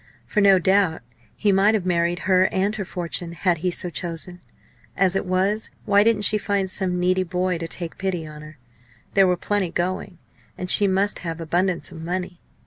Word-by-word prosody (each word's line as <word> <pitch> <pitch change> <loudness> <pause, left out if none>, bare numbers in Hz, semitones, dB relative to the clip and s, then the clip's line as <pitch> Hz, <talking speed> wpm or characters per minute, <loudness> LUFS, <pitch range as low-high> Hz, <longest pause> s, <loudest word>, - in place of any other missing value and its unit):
For, 210 - 0
no 195 -1 +6
doubt, 185 -6 +2 0.3
he 210 - +1
might 200 +3 +4
have 200 -4 -2
married 170 -1 +1
her 185 -1 +4
and 200 +3 0
her 205 -3 -4
fortune 175 -1 -5
had 170 -1 0
he 180 +3 0
so 180 0 -3
chosen. 175 +1 -6 0.6
As 190 -1 +3
it 195 - -1
was, 195 +4 0 0.2
why 205 0 +4
didn't 220 -2 +2
she 215 +1 +4
find 200 -3 -1
some 180 -2 -2
needy 185 +1 +2
boy 180 -1 -1
to 165 - -4
take 170 0 -6
pity 185 -4 -2
on 150 -1 -10
her? 155 0 -12 0.6
There 195 -1 +5
were 180 -1 +1
plenty 205 -2 -1
going, 180 +2 -3 0.4
and 180 0 0
she 205 - +6
must 195 +2 +1
have 165 -1 -5
abundance 175 +2 -1
of 160 - -9
money. 180 +1 -4
185 Hz, 195 wpm, -23 LUFS, 175-195 Hz, 0.6 s, no